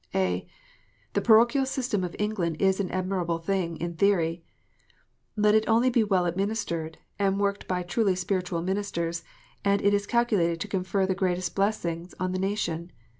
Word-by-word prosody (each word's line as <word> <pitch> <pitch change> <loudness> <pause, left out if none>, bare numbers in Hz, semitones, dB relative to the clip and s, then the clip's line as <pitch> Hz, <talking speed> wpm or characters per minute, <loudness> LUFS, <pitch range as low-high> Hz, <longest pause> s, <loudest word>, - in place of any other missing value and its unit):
(a) 90 -1 0 0.7
The - - +1
parochial 235 +4 +5
system 250 -7 -1
of 175 -1 -4
England 190 -7 -1
is 190 0 +2
an 190 -3 -1
admirable 185 -2 -1
thing 170 -1 -2
in 170 +1 -3
theory. 170 -2 +1 0.9
Let 210 -1 +4
it 220 0 +3
only 235 +3 +4
be 235 -2 +3
well 190 -4 +2
administered, 175 -3 -2 0.2
and 195 0 +1
worked 200 0 -1
by 180 -1 -1
truly 190 +2 +1
spiritual 180 -2 -2
ministers, 170 -3 -2 0.4
and 200 0 +3
it 200 0 +3
is 205 0 0
calculated 205 -9 +2
to - - -3
confer 190 0 0
the 190 - +1
greatest 180 -1 -1
blessings 180 -4 -1
on 185 0 -1
the 185 - -2
nation. 185 -4 -2
190 Hz, 165 wpm, -27 LUFS, 170-205 Hz, 0.9 s, parochial